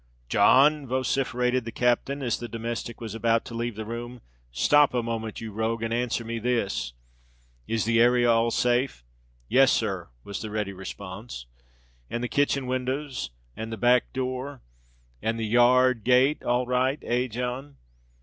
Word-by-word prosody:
"John!" 145 +2 +5
vociferated 130 -1 0
the 115 - -6
captain, 125 +4 0
as 120 -3 -1
the 120 - -5
domestic 115 +1 -5
was 115 -3 -6
about 115 0 +1
to - - -9
leave 120 -1 -3
the 110 +1 -5
room; 120 +2 -6 0.3
"stop 145 - +4
a 120 - +1
moment, 115 -2 -4
you 110 -1 -6
rogue, 110 +2 -2
and 115 0 -1
answer 120 -1 -1
me 115 0 -3
this. 105 - -1 0.7
Is 115 -2 0
the 115 0 +3
area 120 0 +4
all 115 0 +3
safe?" 120 - 0 0.4
"Yes, 135 - +5
sir," 95 -6 -1 0.2
was 100 - -6
the 110 - -5
ready 105 -2 -3
response. 95 - -8 0.6
"And 120 - -3
the - - 0
kitchen 140 +2 +1
windows—and 125 - -4
the 110 - -4
back 125 +3 +3
door—and 115 - -6
the 110 - -1
yar 120 +3 +5
rd 120 -4 -4
gate—all 125 -1 +3
right, 130 +3 +1
eh—John?" 125 +3 -2
120 Hz, 150 wpm, -26 LUFS, 110-125 Hz, 0.7 s, John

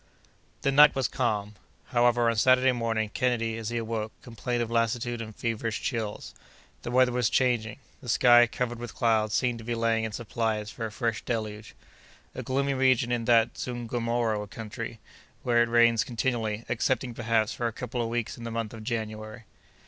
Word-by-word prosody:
The 140 - +2
night 150 +1 +7
was 135 -2 +1
calm. 105 -5 -1 0.4
However, 120 -1 +3
on 115 - +2
Saturday 130 +3 +4
morning, 115 -3 -1
Kennedy, 115 -3 0
as 115 -1 -4
he 120 - -2
awoke, 110 -1 -3
complained 120 +1 -2
of 115 - -6
lassitude 120 +1 0
and 110 -2 -8
feverish 115 -1 -2
chills. 110 -5 -4 0.5
The - - -5
weather 125 0 +4
was 125 -2 +1
changing. 120 -5 +1 0.2
The 125 - -8
sky, 120 0 +6
covered 120 0 -3
with 120 -3 -7
clouds, 110 -2 +2
seemed 120 -2 0
to - - -9
be 120 +1 -2
laying 115 -1 +1
in 110 - -3
supplies 110 -1 -2
for 115 -1 -4
a - - -10
fresh 115 -1 -2
deluge. 110 -2 -4 0.6
A - - -5
gloomy 140 +1 0
region 130 -2 +2
is 120 -1 -1
that 115 -1 +3
Zungomoro 115 -3 -2
country, 115 +2 -7 0.4
where 120 -1 +3
it 120 - +2
rains 115 -1 +4
continually, 115 -2 -2
excepting, 125 +1 0
perhaps, 115 -2 0
for 120 - -2
a - - -2
couple 125 +2 -4
of 115 - -2
weeks 120 0 -3
in - - -8
the 115 - -4
month 115 -1 -4
of 110 -1 -9
January. 110 0 -5
115 Hz, 180 wpm, -27 LUFS, 110-120 Hz, 0.6 s, night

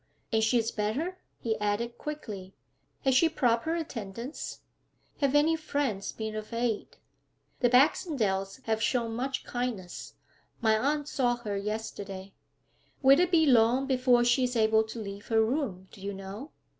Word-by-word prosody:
'And 220 0 +3
she 230 +3 +3
is 225 -1 0
better?' 275 - -2 0.2
He 225 -2 -1
added 220 +3 -1
quickly, 210 -11 -6 0.5
'Has 265 - +3
she 325 +6 +5
proper 255 +1 +1
attendance? 240 - -5 0.6
Have 280 -1 +2
any 310 +3 +5
friends 285 -10 -2
been 220 -1 -5
of 215 +1 -6
aid?' 230 -2 -2 0.6
'The 245 - +4
Baxendales 250 - +2
have 220 -1 0
shown 235 -3 +1
much 265 +3 -2
kindness. 240 -8 -4 0.4
My 220 -2 +3
aunt 290 +6 0
saw 245 -5 +1
her 220 -4 -4
yesterday.' 200 -2 -5 0.7
'Will 270 +3 +7
it 360 -1 +3
be 330 -3 +4
long 250 0 +4
before 255 -2 +3
she 240 +2 +3
is 250 0 -3
able 220 -1 +4
to 220 - -8
leave 200 0 -7
her 220 -1 +3
room, 220 -8 -2
do 195 - -14
you 200 0 -4
know?' 195 +9 -8
235 Hz, 155 wpm, -29 LUFS, 215-270 Hz, 0.7 s, Will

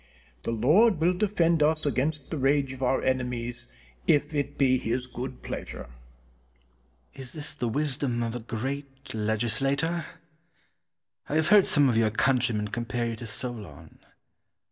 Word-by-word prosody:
The - - -3
Lord 155 - +4
will 170 +3 +3
defend 175 -4 +2
us 155 +1 +2
against 145 +1 -1
the 160 - -2
rage 135 0 +2
of 130 - -11
our 130 +1 +1
enemies 120 -2 -2 0.4
if 150 +1 +3
it 145 -1 -2
be 130 -2 +3
His 120 +3 -2
good 125 +1 -7
pleasure. - - -6 1.2
Cortez. 125 - -10
Is - - -6
this 150 -2 -1
the 120 - -2
wisdom 135 -2 -1
of 115 0 -3
a - - -3
great 135 +4 -5
legislator? 135 +10 0 1.2
I 145 - -1
have 160 +1 +2
heard 205 -2 +7
some 145 -2 +5
of 120 -3 +2
your 115 -1 +4
countrymen 115 -2 +1
compare 120 +1 -2
you 115 - -3
to 115 - -7
Solon. 110 - -6
130 Hz, 150 wpm, -27 LUFS, 120-150 Hz, 1.2 s, heard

